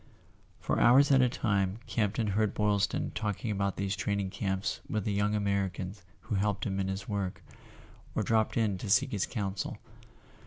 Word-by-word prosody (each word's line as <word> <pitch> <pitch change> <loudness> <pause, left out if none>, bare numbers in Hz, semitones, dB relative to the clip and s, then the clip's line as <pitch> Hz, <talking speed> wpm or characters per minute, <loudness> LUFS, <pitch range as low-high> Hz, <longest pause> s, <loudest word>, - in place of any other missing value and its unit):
For - - 0
hours 135 +4 +6
at 135 -1 +6
a 125 - +4
time 100 -5 0
Campton 110 0 0
heard 105 +1 +1
Boylston 105 -2 +1
talk¬ 105 -1 -3
ing 110 - 0
about 100 -1 -1
these 100 0 -1
training 100 -2 -1
camps 95 -1 -2
with 110 -2 -1
the 105 - 0
young 105 +1 +1
Amer¬ 100 -2 +1
icans 95 +1 -7 0.2
who - - -5
helped 100 0 0
him 95 -1 -1
in 95 - 0
his 95 +1 -4
work, 100 -3 -3 0.7
or - - +1
dropped 110 0 +1
in 105 -5 +1
to 105 - -5
seek 125 +6 +4
his 100 -3 0
counsel. 100 -3 -3
100 Hz, 185 wpm, -30 LUFS, 95-110 Hz, 0.7 s, hours